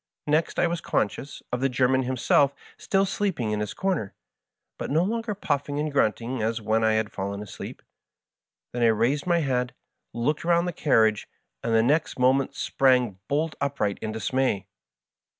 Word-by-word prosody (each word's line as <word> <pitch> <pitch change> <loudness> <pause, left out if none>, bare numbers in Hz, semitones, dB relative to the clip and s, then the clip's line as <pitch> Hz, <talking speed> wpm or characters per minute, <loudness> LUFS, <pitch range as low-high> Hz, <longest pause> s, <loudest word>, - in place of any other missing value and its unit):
Next 155 +2 +1
I - - +3
was 170 -1 -1
conscious 130 +6 -2
of 125 - -1
the 135 - +2
German 130 +1 +2
himself 130 +2 +2 0.2
still 195 0 +1
sleeping 190 - -1
in 105 - -1
his 105 -1 -3
comer, 185 - -1 0.6
but - - -4
no 160 +4 +3
longer 225 +1 -2
puffing 145 -6 -2
and 150 0 -1
grunting 120 -2 0
as 110 +1 0
when 110 +1 +1
I 110 0 +3
had 110 -1 0
fallen 100 +1 -4
asleep. 105 - -9 0.9
Then 120 - -2
I 120 - +5
raised 120 +8 +1
my 170 -1 +3
head, 125 -3 -1 0.4
looked 145 +6 -1
round 170 +1 +2
the 175 - -2
carriage, 110 -9 +2 0.3
and 115 - 0
the 110 - +5
next 150 +6 +1
moment 130 +2 +2
sprang 125 -7 +2
bolt 155 +3 0
upright 140 -8 -1
in 110 - -3
dismay. 110 -2 0
130 Hz, 170 wpm, -26 LUFS, 110-155 Hz, 0.9 s, I